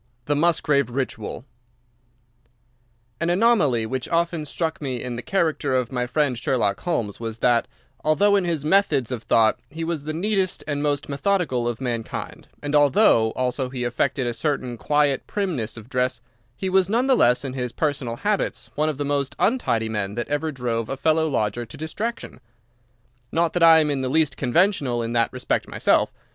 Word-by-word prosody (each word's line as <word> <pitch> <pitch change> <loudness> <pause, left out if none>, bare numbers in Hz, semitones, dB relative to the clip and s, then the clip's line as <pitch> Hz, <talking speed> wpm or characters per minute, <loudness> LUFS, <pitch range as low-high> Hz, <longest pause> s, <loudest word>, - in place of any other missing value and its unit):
VI. 145 - +1
The - - 0
Musgrave 150 -4 +2
Ritual 125 -2 -4 1.7
An 170 +1 0
anomaly 175 - +3
which 130 +2 -4
often 170 -2 0
struck 160 +2 -3
me 130 -4 -3
in 125 0 -4
the 120 - -5
character 155 -6 0
of 125 -1 0
my 125 -1 -1
friend 135 0 +1
Sherlock 115 -6 0
Holmes 120 - -2
was 115 -1 -5
that, 120 0 +2 0.4
although 200 +7 +3
in 200 - +2
his 165 -4 -2
methods 150 - +2
of 125 -3 -3
thought 110 -1 +3
he 165 +1 -6
was 165 -3 -3
the 155 - -2
neatest 190 +2 0
and 145 -1 -2
most 145 -1 -1
methodical 140 -5 0
of 120 -2 -3
mankind, 120 -4 -5 0.2
and 145 0 -3
although 145 - +5
also 130 +1 -1
he 125 -1 -4
affected 125 +2 0
a 120 - -1
certain 130 -2 -2
quiet 145 +2 +1
primness 160 - -2
of 110 0 -10
dress, 125 -1 -1 0.4
he 190 - -3
was 190 0 +3
none 235 +4 +2
the 265 - +4
less 125 - +3
in 130 - -4
his 125 -2 -3
personal 140 -5 -2
habits 205 - -2
one 155 +1 0
of 150 - -3
the 145 - -2
most 140 -1 -1
untidy 155 - +1
men 105 -2 -3
that 120 - -3
ever 150 +2 -1
drove 120 -4 -3
a 135 - -3
fellow 160 +2 +2
lodger 115 -4 -1
to 110 - -11
distraction. 205 +10 -5 0.9
Not 165 0 +1
that 175 - -1
I 165 -1 +8
am 155 -2 +2
in 140 -2 -1
the 130 - -2
least 150 -1 +2
conventional 135 - +1
in 115 +1 -3
that 115 -1 +2
respect 125 -1 -2
myself. - - +2
140 Hz, 185 wpm, -23 LUFS, 120-165 Hz, 1.7 s, I